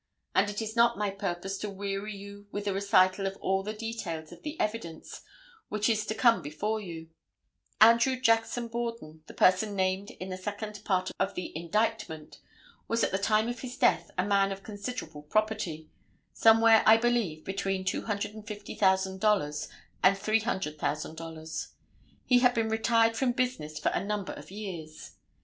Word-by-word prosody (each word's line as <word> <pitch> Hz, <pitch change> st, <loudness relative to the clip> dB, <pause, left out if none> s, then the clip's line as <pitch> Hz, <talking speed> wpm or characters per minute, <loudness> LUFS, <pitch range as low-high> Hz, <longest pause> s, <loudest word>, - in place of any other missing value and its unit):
And 195 Hz, +2 st, +3 dB
it 205 Hz, +2 st, -3 dB
is 220 Hz, +1 st, -5 dB
not 235 Hz, -1 st, +4 dB
my 205 Hz, -1 st, 0 dB
purpose 195 Hz, 0 st, -4 dB
to 210 Hz, -, -3 dB
weary 200 Hz, +1 st, -4 dB
you 200 Hz, +1 st, -11 dB
with 205 Hz, 0 st, -4 dB
a 200 Hz, -, +1 dB
recital 195 Hz, 0 st, +3 dB
of 195 Hz, 0 st, -5 dB
all 190 Hz, 0 st, 0 dB
the 210 Hz, +2 st, -4 dB
details 215 Hz, -8 st, -5 dB
of -, -, -12 dB
the 305 Hz, +1 st, -6 dB
evidence 210 Hz, -7 st, -4 dB, 0.5 s
which 210 Hz, 0 st, 0 dB
is 220 Hz, -2 st, +1 dB
to 215 Hz, -, -2 dB
come 235 Hz, 0 st, +4 dB
before 205 Hz, +10 st, -2 dB
you. 165 Hz, -4 st, -8 dB, 0.7 s
Andrew 235 Hz, +4 st, +6 dB
Jackson 225 Hz, 0 st, +2 dB
Borden, 230 Hz, -10 st, -5 dB
the -, -, -12 dB
person 200 Hz, +3 st, +3 dB
named 190 Hz, +1 st, 0 dB
in 185 Hz, -, -8 dB
the 185 Hz, -, -4 dB
second 205 Hz, +1 st, -5 dB
part 185 Hz, -3 st, 0 dB
of -, -, 0 dB
the 180 Hz, -, -5 dB
indictment, 170 Hz, -2 st, -2 dB, 0.5 s
was 230 Hz, 0 st, +1 dB
at -, -, +1 dB
the 190 Hz, -, 0 dB
time 215 Hz, +2 st, +2 dB
of 240 Hz, -1 st, -4 dB
his 250 Hz, 0 st, -7 dB
death 165 Hz, -3 st, +3 dB
a 180 Hz, -, +1 dB
man 200 Hz, -1 st, +3 dB
of 195 Hz, 0 st, -6 dB
considerable 205 Hz, -7 st, -6 dB
property—somewhere, 215 Hz, +4 st, +2 dB
I 220 Hz, +1 st, +9 dB
believe, 225 Hz, -10 st, 0 dB
between 195 Hz, -1 st, -2 dB
$250,000 200 Hz, -5 st, 0 dB, 0.4 s
and 195 Hz, +1 st, +6 dB
$300,000. 160 Hz, -6 st, -2 dB, 0.6 s
He 250 Hz, -1 st, +5 dB
had 250 Hz, 0 st, +4 dB
been 225 Hz, -1 st, +1 dB
retired 225 Hz, +1 st, +3 dB
from 245 Hz, +1 st, +1 dB
business 245 Hz, -, -2 dB
for 150 Hz, -, +1 dB
a -, -, -1 dB
number 205 Hz, -1 st, -3 dB
of -, -, -11 dB
years. 180 Hz, -6 st, -7 dB
205 Hz, 160 wpm, -29 LUFS, 185-225 Hz, 0.7 s, I